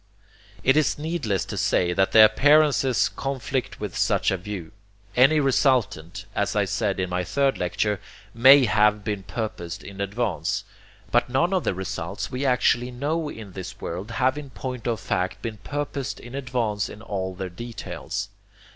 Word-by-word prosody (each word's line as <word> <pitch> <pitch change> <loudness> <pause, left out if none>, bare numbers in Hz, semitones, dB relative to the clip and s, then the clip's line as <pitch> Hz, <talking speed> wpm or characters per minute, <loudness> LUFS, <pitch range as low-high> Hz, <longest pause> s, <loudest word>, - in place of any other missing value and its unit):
It 135 - +4
is 155 -2 +2
needless 150 - -1
to - - -6
say 90 -1 +2
that 95 +1 +2
the 110 -1 +9
appearances 135 -1 +4
conflict 135 -1 -3
with - - -5
such - - +2
a 95 - 0
view. 95 -2 -7 0.4
Any 135 +5 +6
resultant, 125 - +1
as 105 0 -1
I 105 -1 +3
said 100 0 -1
in 95 - 0
my 90 0 0
third 135 +9 +1
lecture, 100 +3 0 0.3
MAY 130 +3 +8
have 105 -1 +3
been 105 -2 -2
purposed 95 -3 -5
in 100 0 -8
advance, 100 -5 -1 0.5
but - - +3
none 170 +9 +1
of 185 - +1
the - - 0
results 95 0 -4
we 130 +2 -1
actually 125 -1 +2
know 150 +5 -2
in 110 -8 -9
is 95 -2 -7
world 90 +6 -5
have 130 +5 +1
in 145 -2 -9
point 125 -2 -6
of 115 -3 0
fact 90 0 -2
been 115 -2 -4
purposed 145 +3 -4
in 120 - -11
advance 120 -6 -1
in 105 - -11
all 95 -4 -3
their 95 0 -5
details. 115 +6 -6
115 Hz, 165 wpm, -24 LUFS, 95-135 Hz, 0.5 s, the